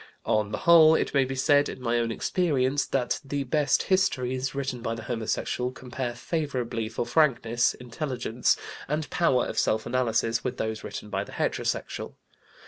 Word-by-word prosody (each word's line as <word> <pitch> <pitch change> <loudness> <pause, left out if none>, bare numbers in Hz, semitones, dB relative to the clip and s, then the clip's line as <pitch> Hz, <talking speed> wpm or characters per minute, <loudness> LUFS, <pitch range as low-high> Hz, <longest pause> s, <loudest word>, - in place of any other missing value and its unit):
On 105 -1 +1
the 105 - -2
whole, 160 -2 +7
it - - -1
may 135 -2 +4
be 135 +1 -4
said, 145 +2 +3
in - - -7
my 120 -1 0
own 115 -1 -1
experience, 145 -1 0
that 125 -3 0
the 140 0 -2
best 145 +2 +2
histories 130 -9 0
written 135 -3 -3
by 115 0 -2
the 115 - -8
homosexual 120 +1 -2
compare 125 -1 -5
favorably 125 -6 -2
for 115 - -3
frankness, 120 -3 +2
intelligence, 125 -1 -1 0.3
and 150 +1 -2
power 135 -8 +2
of - - -2
self 110 0 +1
analysis 120 -2 0
with 125 - -3
those 110 0 -3
written 105 - -7
by - - -1
the - - -12
heterosexual. - - -2
125 Hz, 165 wpm, -27 LUFS, 115-145 Hz, 0.3 s, whole